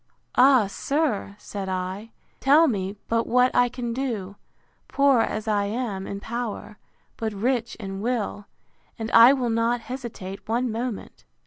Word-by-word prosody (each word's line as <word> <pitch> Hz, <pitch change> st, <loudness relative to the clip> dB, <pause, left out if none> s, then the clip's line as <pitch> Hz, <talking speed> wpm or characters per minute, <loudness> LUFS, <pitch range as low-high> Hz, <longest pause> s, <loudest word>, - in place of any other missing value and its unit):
Ah, 255 Hz, -3 st, +6 dB
sir! 235 Hz, -1 st, -1 dB
said 200 Hz, -2 st, -6 dB
I, 185 Hz, +4 st, -4 dB, 0.3 s
tell 300 Hz, +5 st, +5 dB
me 195 Hz, -5 st, -2 dB
but 230 Hz, 0 st, 0 dB
what 250 Hz, +1 st, +3 dB
I 245 Hz, 0 st, +4 dB
can 240 Hz, -1 st, -4 dB
do, 225 Hz, -7 st, -3 dB, 0.5 s
poor 275 Hz, -3 st, +3 dB
as 215 Hz, -1 st, -2 dB
I 205 Hz, -2 st, +1 dB
am 205 Hz, -3 st, -3 dB
in 200 Hz, -, -5 dB
power, 225 Hz, -1 st, -5 dB, 0.4 s
but 220 Hz, -1 st, -3 dB
rich 235 Hz, +3 st, -1 dB
in 195 Hz, -2 st, -6 dB
will; 220 Hz, -3 st, -2 dB, 0.5 s
and 225 Hz, -1 st, -4 dB
I 230 Hz, +3 st, +9 dB
will 250 Hz, -4 st, -1 dB
not 230 Hz, +1 st, +1 dB
hesitate 220 Hz, -7 st, -7 dB
one 240 Hz, +2 st, 0 dB
moment. 230 Hz, -1 st, -5 dB
230 Hz, 145 wpm, -25 LUFS, 200-250 Hz, 0.5 s, I